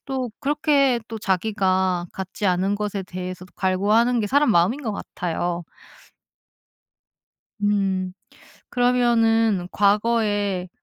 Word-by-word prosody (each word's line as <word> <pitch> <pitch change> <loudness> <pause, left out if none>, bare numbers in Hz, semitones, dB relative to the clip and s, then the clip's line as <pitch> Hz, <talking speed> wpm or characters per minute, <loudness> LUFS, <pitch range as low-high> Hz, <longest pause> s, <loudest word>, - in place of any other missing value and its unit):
또 260 -3 -3
그렇게 280 -3 +2
또 225 -1 -6
자기가 190 -2 0
갖지 190 +2 -4
않은 190 +2 +1
것에 205 -1 -3
대해서도 185 0 -7
갈구하는 210 +6 +2
게 210 - -1
사람 285 +3 +3
마음인 215 +10 +2
것 220 -5 -2
같아요. 175 -2 -3 2.0
음 195 -3 0 0.6
그러면은 230 -5 +2
과거에 205 -3 +1
205 Hz, 220 characters per minute, -23 LUFS, 185-235 Hz, 2.0 s, 사람